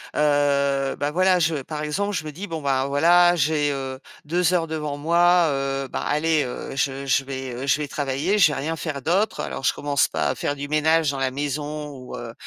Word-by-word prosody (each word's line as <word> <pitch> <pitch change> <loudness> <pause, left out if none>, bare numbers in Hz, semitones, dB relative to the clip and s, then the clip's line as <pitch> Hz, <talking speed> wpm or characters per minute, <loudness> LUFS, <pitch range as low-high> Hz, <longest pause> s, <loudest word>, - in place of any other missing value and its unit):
heu, 140 -2 +2
bah, 145 +1 -1
voilà, 185 +2 +3
je 165 -1 +1
par 150 +2 -6
exemple, 200 +7 -2
je 155 - -3
me 155 - -5
dis: 180 +8 -7
«Bon, 165 -3 -5
ben, 135 -1 +1
voilà, 175 +5 +4
j'ai, 150 -2 +1
heu, 135 -1 -5 0.3
2 175 +2 +1
heures 165 -2 +1
devant 150 -2 -4
moi, 170 +3 +4
heu, 135 -1 -2
ben, - - -4
allez, 155 0 +1
heu, 125 +1 -6
je 140 0 -1
je 135 0 +2
vais, 130 -1 -5
heu, 130 +3 -5
je 140 - +3
vais 150 -1 -3
travailler, 145 +8 -1
je 170 -7 +5
vais - - -3
rien 160 +4 -2
faire 150 -4 -4
d'autre». 190 +9 0
Alors - - -4
je - - +3
commence 145 -1 +1
pas - - -1
à 130 - -1
faire 145 - -2
du 145 0 -6
ménage 155 +1 +2
dans 140 - -5
la 135 -1 0
maison 145 +2 -4
ou, 130 -2 -9
heu, 115 -1 -7
145 Hz, 225 wpm, -23 LUFS, 135-165 Hz, 0.3 s, je